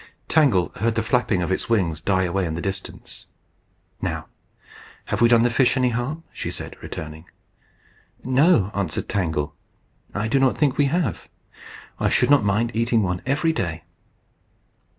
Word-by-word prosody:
Tangle 130 - +3
heard 115 +2 0
the 115 - 0
flapping 110 -5 +1
of 85 - -2
its 105 +5 -2
wings 85 -9 +1
die 95 +1 +1
away 90 0 0
in 80 - -3
the - - -4
distance. 95 0 -6 0.7
"Now - - -3 0.8
have - - -2
we 120 - +7
done 115 -1 +5
the 120 - +2
fish 125 +2 +3
any 125 -1 +3
harm?" 125 +7 -3
she - - -4
said, - - -6
returning. 80 +1 -8 1.0
"No," 130 - +3
answered 95 -6 -2
Tangle, 80 -7 -1 0.6
"I 105 +1 -1
do 135 +5 +2
not 135 -1 +2
think 145 -4 +2
we 145 - +3
have. 170 +5 -1 0.7
I - - +2
should - - +2
not 145 -6 +6
mind 105 +4 +1
eating 115 -1 +2
one 90 -1 -2
every 150 +4 +1
day." 85 - -3
115 Hz, 160 wpm, -23 LUFS, 90-130 Hz, 1.0 s, we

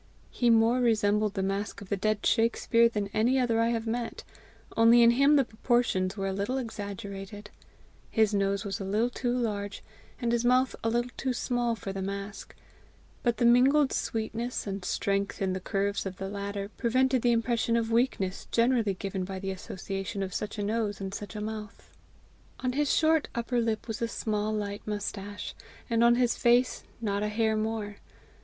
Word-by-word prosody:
He 240 - +1
more 230 +2 +4
resembled 210 -3 +2
the 190 - -1
mask 195 +1 -2
of 200 - -11
the 200 - +1
dead 210 +1 -1
Shakspere 230 0 +3
than 210 -3 -2
any 230 +6 +2
other 240 -3 +2
I 230 - +3
have 230 -1 -1
met, 230 +1 -3 0.5
only 230 +1 +6
in 235 - +7
him 275 +5 +5
the 275 -3 +4
proportions 220 -5 0
were 195 - -2
a 195 - -1
little 200 +7 -1
exaggerated; 205 -3 -6 0.6
his 220 -2 +2
nose 200 +1 0
was 195 -1 -3
a - - -4
little 215 +5 0
too 245 -1 -2
large, 210 -5 -2 0.4
and 235 -1 0
his 235 0 +1
mouth 255 +1 +3
a 225 - +2
little 240 +2 0
too 260 -1 -1
small 245 -1 0
for 195 -3 -6
the 195 - -4
mask; 200 +1 -6 0.7
but 240 -2 +1
the 240 - +2
mingled 260 +4 +5
sweetness 230 +2 -2
and 195 -2 -4
strength 200 +2 -1
in 190 -1 0
the 185 - -2
curves 200 +1 -1
of 185 -1 -7
the 195 0 -4
latter 200 0 -4
prevented 255 +1 +2
the 240 - +3
impression 230 0 +1
of 230 0 -1
weakness 225 -6 0
generally 230 -4 +2
given 190 0 -3
by 190 +1 -5
the 195 0 -3
association 195 +1 -5
of 190 -1 -5
such 210 +1 -4
a 205 - -2
nose 210 -1 -1
and 195 -1 -5
such 205 +2 -7
a 210 - -4
mouth. 215 0 -7 0.7
On 255 - 0
his 290 +1 +1
short 320 -1 +3
upper 235 +1 0
lip 225 -1 -2
was 225 0 -4
a 230 - +1
small 215 -2 -2
light 205 -1 -3
moustache, 205 -1 -4 0.4
and 230 0 +3
on 235 0 +6
his 245 -1 +2
face 245 +1 +3 0.2
not 200 -2 -1
a 210 - 0
hair 220 0 +1
more. 215 -1 -2
220 Hz, 190 wpm, -28 LUFS, 200-235 Hz, 0.7 s, in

